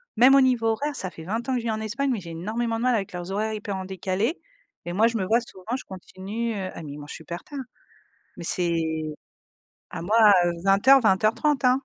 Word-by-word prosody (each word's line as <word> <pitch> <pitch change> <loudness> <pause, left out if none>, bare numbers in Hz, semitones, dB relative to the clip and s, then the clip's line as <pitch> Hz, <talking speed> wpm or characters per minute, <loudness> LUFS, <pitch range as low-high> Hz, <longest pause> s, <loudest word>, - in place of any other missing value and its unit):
même 250 +4 +7
au 275 - +7
niveau 250 -3 +2
horaire, 285 +7 -1
ça 185 -9 -3
fait 160 - -10
20 225 +8 -3
ans 265 - 0
que 250 - +1
je - - -7
vis 225 - 0
en 220 - -2
Espagne, 265 +6 -1
mais 235 - -1
j'ai 170 -1 -9
énormément 225 +7 -2
de 225 - -4
mal 250 -1 +3
avec 200 -2 -3
leurs 180 +1 -5
horaires 215 +2 -1
hyper 210 -2 -4
en 190 - -5
décalés 190 - -2 0.5
et 175 - -4
moi, 215 +4 +4
je 235 - -2
me 190 - -1
vois 230 +4 +3
souvent, 225 0 -6
je - - -10
continue, 200 +5 -5
heu 190 -2 -4
ah - - -8
mais 145 -2 -7
ils - - -9
mangent 145 0 -8
super 170 +2 -7
tard, 285 -2 -8 0.8
mais - - -7
c'est 170 -1 +1 1.1
ah - - -5
moi, 205 +7 +1 0.3
heu, 175 - +2
20:00-20:30, 225 +5 +4
hein. 250 - +6
215 Hz, 235 wpm, -25 LUFS, 185-235 Hz, 1.1 s, même